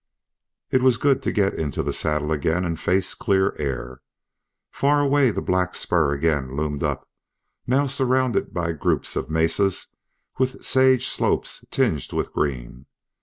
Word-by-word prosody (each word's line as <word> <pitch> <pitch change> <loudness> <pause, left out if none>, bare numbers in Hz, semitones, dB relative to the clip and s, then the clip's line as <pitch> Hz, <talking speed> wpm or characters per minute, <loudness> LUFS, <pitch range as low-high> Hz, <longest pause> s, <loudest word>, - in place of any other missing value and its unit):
It 130 - +3
was 130 -2 +4
good 140 -2 +2
to - - -1
get 100 -2 +1
into 75 -4 -3
the - - -2
saddle 75 0 -1
again 80 +4 0
and 85 -2 -3
face 95 +2 0
clear 95 -1 +1
air. 65 -3 -4 0.7
Far 145 +1 +2
away 140 -2 +3
the - - -3
black 90 -1 0
spur 80 -5 +1
again 70 -3 -1
loomed 75 -2 -2
up, - - -2 0.6
now 135 +3 +2
surrounded 130 -2 +1
by 85 -1 -2
groups 80 - -1
of 65 - -3
mesas 80 +5 +1 0.5
with 130 0 -1
sage 130 -1 +4
slopes - - -1
tinged - - 0
with - - -2
green. 65 -2 -3
90 Hz, 150 wpm, -23 LUFS, -, 0.7 s, was